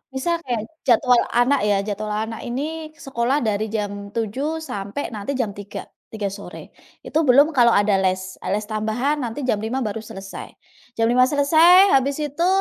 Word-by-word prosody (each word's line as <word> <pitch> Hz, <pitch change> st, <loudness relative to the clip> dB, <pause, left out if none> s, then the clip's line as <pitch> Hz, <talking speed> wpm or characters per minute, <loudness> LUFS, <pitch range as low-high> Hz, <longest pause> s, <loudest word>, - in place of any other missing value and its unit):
Misal 335 Hz, +6 st, 0 dB
kayak 240 Hz, -4 st, -1 dB, 0.3 s
jadwal 245 Hz, 0 st, +4 dB
anak 245 Hz, +4 st, +3 dB
ya, 205 Hz, -, +3 dB
jadwal 210 Hz, +1 st, -3 dB
anak 220 Hz, +1 st, -3 dB
ini 310 Hz, +5 st, -4 dB
sekolah 265 Hz, -1 st, -1 dB
dari 215 Hz, +1 st, 0 dB
jam 205 Hz, -1 st, -4 dB
07.00 265 Hz, +9 st, -2 dB
sampai 205 Hz, -3 st, -5 dB
nanti 205 Hz, +6 st, -4 dB
jam 225 Hz, -5 st, 0 dB
03.00, 205 Hz, 0 st, -8 dB, 0.2 s
03.00 215 Hz, -2 st, -3 dB
sore. 200 Hz, 0 st, -10 dB, 0.3 s
Itu 315 Hz, +1 st, 0 dB
belum 280 Hz, +5 st, +6 dB
kalau 235 Hz, -1 st, +6 dB
ada 205 Hz, 0 st, +3 dB
les, 185 Hz, 0 st, -1 dB, 0.2 s
les 210 Hz, +1 st, -2 dB
tambahan 220 Hz, +7 st, -1 dB
nanti 235 Hz, +4 st, -4 dB
jam 215 Hz, -, +2 dB
5.00 245 Hz, +4 st, -2 dB
baru 210 Hz, +1 st, -3 dB
selesai. 195 Hz, -2 st, -9 dB, 0.5 s
Jam 225 Hz, -, +3 dB
5.00 255 Hz, +1 st, +5 dB
selesai 330 Hz, +7 st, +6 dB
habis 275 Hz, +2 st, +1 dB
itu, 295 Hz, +5 st, -1 dB
235 Hz, 165 wpm, -22 LUFS, 210-285 Hz, 0.5 s, belum